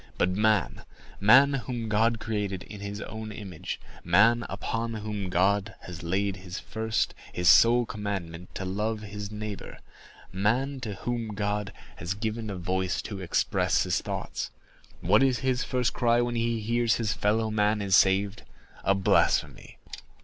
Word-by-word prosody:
But 90 - +2
man—man, 110 - +3
whom 125 -3 -3
God 110 +2 +2
created 105 -4 -3
in 105 0 -10
his 100 +1 -5
own 110 0 -6
image—man, 105 +3 0
upon 115 0 -3
whom 105 -3 -4
God 95 +3 +1
has 90 -1 -8
laid 95 +3 -1
his 90 -1 -8
first, 110 0 -1 0.2
his 90 -1 -1
sole 120 +6 +7
commandment, 95 -5 -5
to 95 - -4
love 105 +3 -2
his 105 -1 -6
neighbor—man, 105 +4 -4
to 110 -5 -5
whom 115 0 -3
God 105 0 -2 0.3
has 90 +2 -3
given 110 +1 -3
a 100 - -4
voice 90 +1 -1
to 100 -3 -6
express 90 -3 +1
his - - 0
thoughts—what - - -2
is 130 -2 +3
his 130 -1 +1
first 125 -2 0
cry 120 -1 +3
when 120 0 0
he 115 -1 0
hears 115 +1 +2
his 110 -2 0
fellow 110 +1 +1
man 105 0 +2
is 100 -2 +2
saved? 95 +1 +3 0.4
A 100 - +3
blasphemy. 95 - +1
105 Hz, 140 wpm, -27 LUFS, 95-115 Hz, 0.4 s, sole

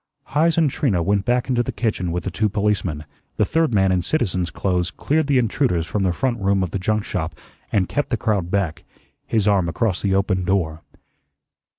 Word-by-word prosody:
Heise 160 +3 +2
and 165 -2 +4
Trina 115 - 0
went 100 +2 +1
back 125 0 +1
into 125 -2 +2
the 120 - -2
kitchen 105 -7 -1
with 90 +1 -2
the 95 - -3
two 105 +4 0
policemen, 100 -7 -1 0.3
the 105 - +3
third 160 +4 +1
man 95 -3 +3
in 90 -1 +2
citizen's 90 - 0
clothes 90 -2 -1
cleared 155 0 0
the 140 -2 +3
intruders 115 - +1
from 100 +5 -2
the 95 -2 +2
front 120 +6 -1
room 100 -1 +2
of 90 - -3
the 100 - -2
junk 105 +3 0
shop - - -3 0.4
and 95 -3 +2
kept 145 -1 -2
the 120 - 0
crowd 105 -7 0
back, 90 -4 -1 0.4
his 110 -2 +1
arm 95 -4 +3
across 95 0 -1
the 95 -1 +1
open 95 -1 +1
door. 85 -4 0
100 Hz, 205 wpm, -22 LUFS, 90-120 Hz, 0.4 s, and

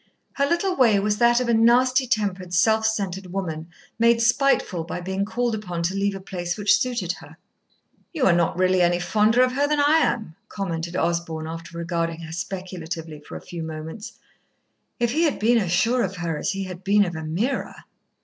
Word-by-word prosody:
Her 280 0 +1
little 360 +4 0
way 230 - +4
was 210 +1 0
that 240 0 +5
of 250 - -1
a 235 - +2
nasty 250 +3 +4
tempered, 195 -6 -1
self 220 +4 +3
centred 195 -3 -2
woman, 165 -4 -4 0.3
made 230 0 +4
spiteful 240 -7 +2
by 170 - -5
being 190 +2 -2
called 235 +2 -1
upon 180 -6 -4
to 175 +3 0
leave 200 0 0
a - - -6
place 175 -2 -4
which 205 -1 +4
suited 235 -8 -1
her. 160 0 -14 0.7
"You 310 -7 0
are 180 - +5
not 170 -1 +1
really 185 0 +3
any 175 0 +3
fonder 215 +7 +3
of 255 - +2
her 280 +3 +1
than 300 0 +1
I 295 +3 +5
am," 220 - -1
commented 170 -3 -4
Osborn, 170 -2 -1
after 165 +1 -8
regarding 170 -1 -2
her 160 -1 -8
speculatively 170 -3 -6
a - - -5
few 170 -1 -8
moments. 160 +8 -7 0.9
If 235 -1 +1
he 310 +6 +1
had 315 -4 +2
been 230 +2 +3
as 185 -5 -2
sure 230 +8 +2
of 195 -2 -2
her 170 -3 -3
as 150 - -2
he 195 0 -3
had 185 -1 -8
been 200 +1 +4
of 175 - -4
Ameerah 170 - -3
195 Hz, 195 wpm, -23 LUFS, 170-235 Hz, 0.9 s, that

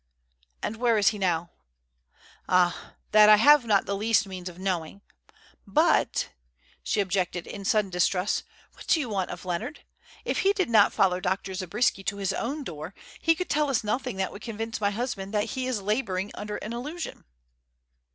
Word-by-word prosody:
"And 225 - -3
where 235 -1 +2
is 205 -1 +5
he 210 - -5
now?" 175 -3 0 1.0
"Ah, 180 -1 +1 0.2
that 215 0 +7
I 215 - +10
have 285 +4 +6
not 205 -3 +3
the 200 - -2
least 215 +1 +2
means 185 -2 -7
of 175 - -13
knowing. 185 0 -3 0.7
But," - - +2 0.5
she 210 - 0
objected, 185 -2 -1
in 200 -1 -8
sudden 210 -1 +2
distrust, 180 +2 +1 0.3
"what - - -14
do 330 - +4
you 280 - -2
want 195 -3 -1
of 175 +1 -8
Leonard? 180 - -4 0.4
If - - -1
he 395 +1 +3
did 375 - -1
not 210 -3 +6
follow 180 -2 +2
Dr. 190 +1 -2
Zabriskie 195 +3 0
to 200 - -2
his 195 -2 -1
own 285 +5 -3
door, 160 - -7 0.2
he 330 0 +3
could 365 +2 -3
tell 300 0 +1
us 255 -6 +1
nothing 245 +2 -2
that 190 0 -2
would 205 - -10
convince 225 0 -5
my 205 - +3
husband 205 -2 -4
that 210 +2 0
he 260 -1 -2
is 230 -6 -2
labouring 200 -2 -1
under 210 0 -5
an 220 - -6
illusion." 300 +8 -6
205 Hz, 180 wpm, -27 LUFS, 185-235 Hz, 1.0 s, I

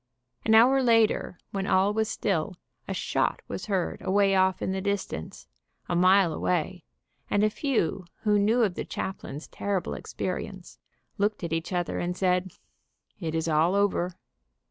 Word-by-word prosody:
An 220 - +5
hour 260 +4 +6
later, 225 -6 +2
when 195 -1 -2
all 195 +2 +3
was 220 0 0
still, 185 -3 -1 0.3
a - - -2
shot - - -1
was - - -6
heard 190 -4 -1
away 195 +1 +3
off 190 -1 +3
in - - -2
the 190 0 -2
distance, 200 - -4 0.4
a 175 - -1
mile 185 -1 +5
away, 180 0 -1 0.4
and 205 - +2
a 215 - +3
few 210 - -1 0.2
who 210 -1 +3
knew 225 +4 +3
of 200 -5 +1
the - - -4
chaplain's 160 -5 -6
terrible 200 -3 -2
experience 185 0 -5 0.4
looked 205 -1 0
at 165 -1 -2
each 165 +2 -2
other 175 -2 -1
and 180 +1 -2
said, 180 0 +1 0.7
"It 165 -4 -3
is 160 0 -1
all 160 +4 +3
over." 185 -3 +1
190 Hz, 160 wpm, -27 LUFS, 175-205 Hz, 0.7 s, hour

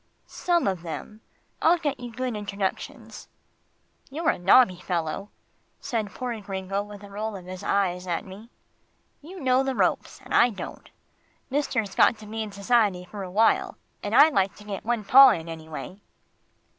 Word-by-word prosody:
"Some 345 -2 0
of 190 -4 -1
them 180 +6 -7 0.4
I'll 335 +2 +5
get 290 -4 -3
you 245 -1 -7
good 250 0 -3
introductions." 210 +4 -5 0.8
"You're 315 +5 +1
a - - -6
nobby 185 0 +5
fellow," 175 +2 -3 0.5
said 225 -6 -3
poor 240 -3 -5
Gringo 195 0 -3
with 205 0 -10
a 200 - -11
roll 215 +1 -4
of 185 -2 -9
his 185 +1 -8
eyes 185 -3 0
at 170 -1 -2
me. 200 +4 -12 0.7
"You 360 +6 -10
know 260 -2 +2
the 270 -1 -2
ropes, - - 0
and - - -7
I 240 - +6
don't. 210 - -8 0.6
Mister's 225 -8 -1
got 230 - +4
to 215 - -12
be 220 +1 -5
in 215 -1 -5
society 200 -3 +1
for 200 +3 -8
a 185 - -6
while, 215 +5 +2 0.2
and - - -2
I'd 310 0 +7
like 195 0 +1
to 210 - -14
get 205 -2 -6
one 235 -1 -1
paw 270 +5 +9
in 170 -8 -1
anyway." 160 +4 -8
210 Hz, 170 wpm, -25 LUFS, 190-245 Hz, 0.8 s, paw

